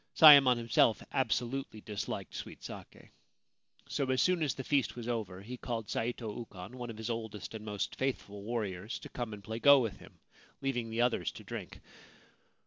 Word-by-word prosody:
Sayemon 140 Hz, -6 st, +9 dB
himself 115 Hz, -2 st, +3 dB
absolutely 125 Hz, -1 st, -1 dB
disliked 105 Hz, -1 st, -5 dB
sweet -, -, -8 dB
sake. -, -, -10 dB, 0.8 s
So 135 Hz, -2 st, -1 dB
as 130 Hz, 0 st, +2 dB
soon 180 Hz, -2 st, +3 dB
as 150 Hz, -3 st, +1 dB
the 135 Hz, -, -5 dB
feast 135 Hz, -2 st, +1 dB
was 120 Hz, -1 st, -6 dB
over 100 Hz, -6 st, -3 dB
he 125 Hz, +4 st, -7 dB
called 115 Hz, -3 st, -4 dB
Saito 115 Hz, -2 st, -2 dB
Ukon, 105 Hz, -1 st, -9 dB
one 120 Hz, -1 st, -5 dB
of 110 Hz, -, -7 dB
his 110 Hz, +2 st, -3 dB
oldest 110 Hz, -2 st, -5 dB
and 110 Hz, -1 st, -6 dB
most 105 Hz, -2 st, -3 dB
faithful 115 Hz, -6 st, -2 dB
warriors, 105 Hz, -2 st, -3 dB
to -, -, -10 dB
come 120 Hz, -3 st, -4 dB
and 105 Hz, -1 st, -8 dB
play 110 Hz, +2 st, -5 dB
go 140 Hz, +2 st, +8 dB
with 110 Hz, -6 st, -2 dB
him, -, -, -15 dB, 0.4 s
leaving 125 Hz, -4 st, -2 dB
the 115 Hz, +1 st, 0 dB
others 120 Hz, -1 st, +1 dB
to -, -, -10 dB
drink. -, -, -7 dB
115 Hz, 180 wpm, -32 LUFS, 105-125 Hz, 0.8 s, Sayemon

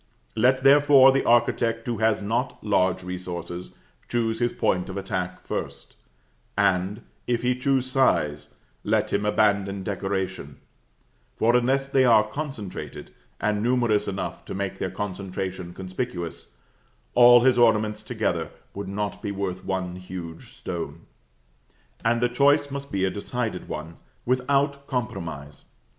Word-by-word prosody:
Let, 130 Hz, +3 st, +3 dB
therefore, 140 Hz, -1 st, +7 dB
the 135 Hz, 0 st, +1 dB
architect 115 Hz, -1 st, +2 dB
who 120 Hz, -2 st, -2 dB
has 110 Hz, -2 st, +2 dB
not 115 Hz, +5 st, -2 dB
large 95 Hz, -3 st, +1 dB
resources, 90 Hz, -1 st, -6 dB, 0.4 s
choose 115 Hz, -2 st, 0 dB
his 120 Hz, 0 st, +1 dB
point 90 Hz, 0 st, 0 dB
of 95 Hz, -, -5 dB
attack 95 Hz, -2 st, -3 dB
first, -, -, -5 dB, 0.6 s
and, 95 Hz, +2 st, +1 dB, 0.2 s
if 120 Hz, -1 st, 0 dB
he 125 Hz, 0 st, +2 dB
choose 130 Hz, 0 st, +1 dB
size, 75 Hz, -, +1 dB, 0.3 s
let -, -, 0 dB
him 105 Hz, +1 st, +1 dB
abandon 100 Hz, -2 st, +1 dB
decoration; 95 Hz, -1 st, -3 dB, 0.8 s
for, 115 Hz, +2 st, +3 dB
unless 135 Hz, +3 st, +2 dB
they 135 Hz, -1 st, +3 dB
are 110 Hz, -4 st, +5 dB
concentrated, 125 Hz, -6 st, -6 dB, 0.3 s
and 105 Hz, -1 st, 0 dB
numerous 120 Hz, -3 st, +2 dB
enough 100 Hz, 0 st, -4 dB
to -, -, -6 dB
make 100 Hz, 0 st, -3 dB
their 95 Hz, -, -1 dB
concentration 95 Hz, -2 st, -5 dB
conspicuous, 95 Hz, -, -5 dB, 0.6 s
all 120 Hz, 0 st, +8 dB
his 125 Hz, -1 st, +4 dB
ornaments 110 Hz, -2 st, +3 dB
together -, -, -2 dB, 0.2 s
would 100 Hz, -, -6 dB
not 105 Hz, +1 st, -3 dB
be 100 Hz, -, -3 dB
worth 95 Hz, -2 st, -4 dB
one 90 Hz, -1 st, -3 dB
huge 90 Hz, -3 st, -8 dB
stone. 85 Hz, -3 st, -6 dB, 1.0 s
And 115 Hz, +1 st, +2 dB
the 120 Hz, -, +4 dB
choice 140 Hz, +3 st, +3 dB
must 140 Hz, 0 st, -6 dB
be 95 Hz, -2 st, +1 dB
a 95 Hz, -, 0 dB
decided 110 Hz, -2 st, -4 dB
one, 80 Hz, +2 st, -6 dB, 0.3 s
without 140 Hz, +3 st, +1 dB
compromise. 85 Hz, -, -5 dB
105 Hz, 135 wpm, -25 LUFS, 95-125 Hz, 1.0 s, all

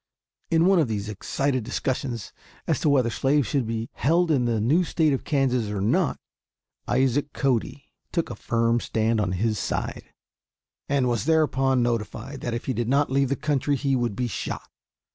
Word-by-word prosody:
In 165 Hz, 0 st, +3 dB
one 190 Hz, -1 st, +5 dB
of 155 Hz, -, +2 dB
these 105 Hz, -2 st, -3 dB
excited 130 Hz, +5 st, -1 dB
discussions 125 Hz, -2 st, -3 dB, 0.3 s
as -, -, 0 dB
to 150 Hz, -, +2 dB
whether 130 Hz, -5 st, +3 dB
slaves 140 Hz, +2 st, +2 dB
should 135 Hz, -3 st, -1 dB
be 115 Hz, 0 st, -3 dB
held 165 Hz, +5 st, +2 dB
in 130 Hz, -5 st, +2 dB
the 115 Hz, -2 st, +1 dB
new 145 Hz, -, +3 dB
State 160 Hz, -3 st, +1 dB
of 135 Hz, -, -2 dB
Kansas 125 Hz, -6 st, +1 dB
or 105 Hz, -1 st, -3 dB
not, 100 Hz, +3 st, +1 dB, 0.7 s
Isaac 135 Hz, +2 st, +1 dB
Cody 135 Hz, +1 st, -1 dB, 0.2 s
took 170 Hz, -7 st, -1 dB
a -, -, -5 dB
firm 115 Hz, +2 st, +1 dB
stand 110 Hz, -1 st, 0 dB
on 90 Hz, -3 st, -1 dB
his 105 Hz, +2 st, 0 dB
side, -, -, -4 dB, 0.8 s
and 135 Hz, -3 st, +2 dB
was 120 Hz, -3 st, 0 dB
thereupon 135 Hz, -5 st, +2 dB
notified 120 Hz, +3 st, -3 dB
that 120 Hz, -1 st, -2 dB
if 120 Hz, -, -5 dB
he 130 Hz, -, -1 dB
did 120 Hz, 0 st, -2 dB
not 140 Hz, +1 st, +2 dB
leave 135 Hz, -1 st, +2 dB
the 140 Hz, -, +1 dB
country 145 Hz, -1 st, 0 dB
he 135 Hz, 0 st, 0 dB
would 120 Hz, -4 st, -1 dB
be 125 Hz, -, -1 dB
shot. 120 Hz, -, -5 dB
130 Hz, 180 wpm, -25 LUFS, 115-140 Hz, 0.8 s, one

